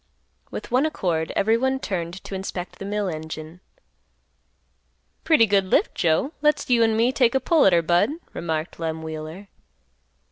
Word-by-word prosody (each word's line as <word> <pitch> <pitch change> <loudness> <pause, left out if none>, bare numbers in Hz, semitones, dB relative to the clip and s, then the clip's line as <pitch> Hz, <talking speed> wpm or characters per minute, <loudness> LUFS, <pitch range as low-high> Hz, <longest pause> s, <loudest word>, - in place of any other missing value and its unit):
With - - -7
one 260 +5 +3
accord 170 - -2
everyone 245 +5 +2
turned 180 -4 -4
to - - -8
inspect 190 -1 -5
the 195 - -6
mill 205 0 -1
engine. 160 0 -6 1.6
"Pretty 310 -9 +5
good 200 -2 +2
lift, 185 - +2
Joe. 170 - +1
Let's 300 0 +2
you 235 -1 +4
an' 225 -1 +3
me 235 +3 +3
take 250 -2 +2
a - - +4
pull 320 - +4
at 190 - +4
her, 170 -1 +4
Budd," 175 - +2 0.2
remarked 160 -1 -4
Lem 160 -1 -3
Wheeler. 160 +5 -7
190 Hz, 155 wpm, -23 LUFS, 165-230 Hz, 1.6 s, Pretty